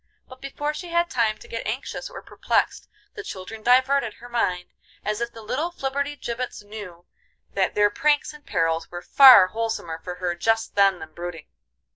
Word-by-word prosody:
But 255 0 -14
before 290 +2 -3
she 355 +4 -7
had 340 0 0
time 225 -4 +1
to - - -15
get 230 - -5
anxious 245 +6 -4
or - - -10
perplexed - - -1 0.2
the 425 - -7
children 215 - -8
diverted 255 -1 +3
her 245 - -13
mind, 185 -7 -1 0.3
as 210 +2 -2
if 235 0 -2
the 225 -1 -12
little 290 +10 -2
flibberty 285 -3 -3
gibbets 240 -4 -5
knew 205 -5 -10 0.5
that 190 -1 0
their 205 0 +4
pranks 295 +6 +1
and 300 -1 -14
perils 165 - -1
were 175 0 -8
far 255 -9 +8
wholesomer 220 -8 -3
for 180 -1 -5
her 180 -1 -2
just 225 +6 0
then 195 -2 +4
than 155 -2 -11
brooding. 170 -2 -7
225 Hz, 180 wpm, -24 LUFS, 185-270 Hz, 0.5 s, far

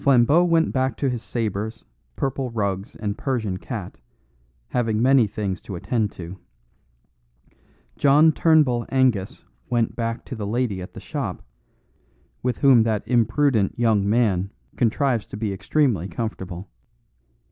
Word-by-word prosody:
Flambeau 140 +5 +5
went 165 -2 +2
back 130 -2 0
to 135 -3 0
his 120 -2 -3
sabres, 110 -2 -3 0.3
purple 135 - -2
rugs 100 -3 -3
and 105 -2 -3
Persian 110 -9 -1
cat, - - -7 0.7
having 115 -3 0
many 130 -1 +5
things 100 -2 -4
to 95 - -7
attend 105 +3 -1
to. 90 +2 -9 1.6
John 150 +3 +6
Turnbull 150 -7 +3
Angus 125 -8 +1 0.3
went 120 -2 0
back 115 0 -3
to - - -7
the 105 -3 -4
lady 110 -4 -1
at 90 - -10
the - - -7
shop, - - -5 1.0
with 125 -2 -1
whom 135 -4 +6
that 110 -2 -1
imprudent 120 -2 +2
young 110 -4 +2
man 100 -5 +2 0.3
contrives 120 0 +1
to - - -8
be 105 -2 -2
extremely 110 - +1
comfortable. 95 -1 -5
115 Hz, 135 wpm, -23 LUFS, 100-130 Hz, 1.6 s, John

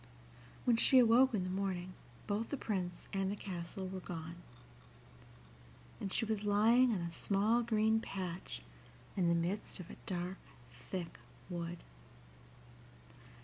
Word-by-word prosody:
When 240 -2 +4
she 260 - +6
awoke 250 +1 +6
in 190 - 0
the 185 - -3
morning 185 -1 -2 0.3
both 215 +2 -1
the 285 - -2
Prince 185 -7 -3
and 195 0 +1
the - - -2
castle 185 -1 -5
were 185 0 -5
gone, 170 -1 -6 1.6
and 195 - -3
she 225 - +2
was 215 -2 -1
lying 225 +5 +5
on 200 -5 0
a 170 0 -3
small 205 +7 +2
green 220 -1 +3
patch 185 - -5 0.5
in 185 -3 +2
the 170 - +4
midst 180 +5 -1
of 180 +2 -8
a - - -10
dark, 180 0 -3 0.3
thick 170 +8 -6 0.3
wood. 170 0 -4
195 Hz, 140 wpm, -35 LUFS, 175-220 Hz, 1.6 s, she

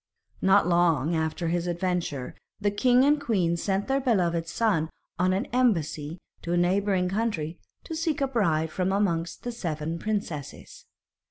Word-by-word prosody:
Not 195 +1 +5
long 170 -3 +3
after 160 +1 -1
this 175 0 -1
adventure 175 -6 -2 0.3
the 205 0 +1
king 250 +5 +4
and 295 0 +3
queen 190 -10 +1
sent 195 +3 -1
their 270 0 +2
beloved 175 -10 +1
son 165 -5 +1 0.3
on 185 +1 +3
an 190 +1 0
embassy 165 - +1 0.2
to 170 - -3
a - - +2
neighbouring 185 +1 +2
country 185 -6 -2 0.2
to 325 - -6
seek 315 -1 -1
a 275 - +1
bride 160 -11 +1
from 185 +2 0
amongst 170 -4 -1
the 245 - -3
seven 165 -6 -3
princesses. 185 -10 -5
180 Hz, 155 wpm, -27 LUFS, 165-215 Hz, 0.3 s, Not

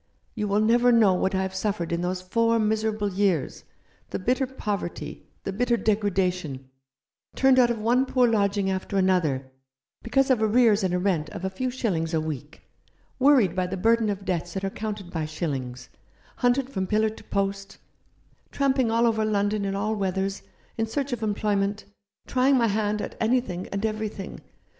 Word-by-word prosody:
You 210 -2 -2
will 205 +1 +2
never 240 +3 +4
know 220 -5 +5
what 190 +1 0
I 190 - +1
have 190 0 -4
suffered 190 -3 -2
in 170 0 -1
those 180 +1 -2
four 230 +4 +2
miserable 215 -2 0
years; 185 -7 0 0.4
the - - -3
bitter 255 +6 0
poverty; 210 -8 -5 0.2
the 195 - -3
bitter 240 +3 +1
degradation; 180 - -1 0.6
turned 265 -1 +5
out 245 -1 +5
of 235 - -1
one 240 +5 +2
poor 255 -1 +3
lodging 200 -3 +1
after 190 +1 -3
another, 160 -9 +1 0.5
because 270 +3 +2
of 245 -4 +2
arrears 220 -1 +4
in 185 - +1
a 180 - +1
rent 180 -5 0
of 185 - -6
a 190 - -2
few 255 +7 -2
shillings 180 -10 -1
a - - +2
week; 155 -1 -6 0.6
worried 255 - +4
by 185 -1 0
the 190 +1 -4
burden 225 +2 +2
of 200 -1 -4
debts 175 0 -2
that 190 - -3
are 195 - -1
counted 210 -4 -5
by 160 -3 -2
shillings; 135 -6 -4 0.5
hunted 250 +1 +2
from 190 -6 -2
pillar 215 +1 +2
to 220 - -13
post; 195 0 -2 0.7
tramping 265 -3 +1
all 230 +1 +3
over 220 -2 +2
London 205 -1 0
in 195 0 -2
all 215 +2 -1
weathers, 195 0 -2 0.4
in 225 - +1
search 275 +3 -2
of 235 - -4
employment; 205 -1 -1 0.4
trying 265 +1 +3
my 235 - +3
hand 210 -1 0
at - - -6
anything 220 -6 0
and 200 +2 -3
everything. 215 -2 -4
205 Hz, 175 wpm, -25 LUFS, 185-230 Hz, 0.7 s, know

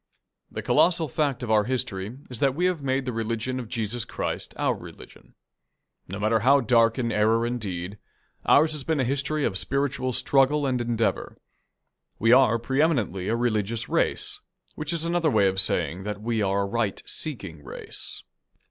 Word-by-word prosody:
The - - -6
colossal 170 -2 +3
fact 145 -5 -1
of 115 - -2
our 105 -1 +4
history 120 -3 -2
is 125 -3 -7
that 135 -1 +2
we 175 +4 +1
have 180 -4 0
made 135 -1 -1
the 125 - -3
religion 115 +3 -2
of 120 -3 -7
Jesus 115 -1 -2
Christ - - -4
our - - +1
religion. - - -13 0.7
No 95 - -5
matter 110 +2 +2
how 135 +5 +5
dark 115 -2 +3
in 120 -3 -1
error 110 +2 +2
and 120 0 -2
deed, 95 0 -5 0.5
ours 155 +2 +5
has 150 -3 -2
been 160 +1 0
a - - +2
history 140 +4 -1
of 95 -4 0
spiritual 140 -2 -1
struggle 140 +4 +2
and 125 -2 0
endeavour. 115 -1 -1 0.8
We 115 +2 +3
are 125 -3 +6
pre 130 +5 0
eminently 105 - 0
a 115 - +1
religious 115 -2 -1
race, - - +1 0.3
which 155 +1 -4
is 165 -1 -1
another 170 -1 +1
way 105 -7 +3
of 95 0 +4
saying 90 +3 0
that 105 +1 -5
we 110 0 -1
are 100 0 +1
a - - -2
right 110 -1 -1
seeking 85 - -5
race. - - -7
120 Hz, 180 wpm, -25 LUFS, 110-140 Hz, 0.8 s, are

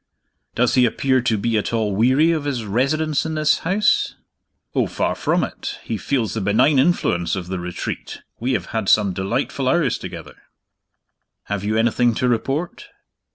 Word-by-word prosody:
"Does 125 0 +2
he 125 -2 +5
appear 130 +2 +1
to 115 -3 +1
be 110 +1 0
at - - -3
all 110 -4 0
weary 130 +10 +4
of 155 -3 -1
his 130 -6 -2
residence 140 +8 0
in 160 -1 -3
this 155 -1 +2
house?" 200 +5 +1 0.6
"Oh, - - +1
far - - -1
from - - 0
it! - - -5
He 115 - -3
feels 115 0 -1
the 110 - -2
benign 110 +8 +3
influence 85 - +1
of 90 -2 -6
The 95 -1 -3
Retreat; 90 0 -6 0.2
we 125 +3 -1
have - - -1
had 110 -4 -1
some 100 -3 +4
delightful 120 +7 -1
hours 160 -6 +1
together." - - -9 1.1
"Have 100 -1 -4
you 110 +2 0
anything 120 +1 +2
to 125 - 0
report?" 135 +8 -2
120 Hz, 170 wpm, -21 LUFS, 105-140 Hz, 1.1 s, he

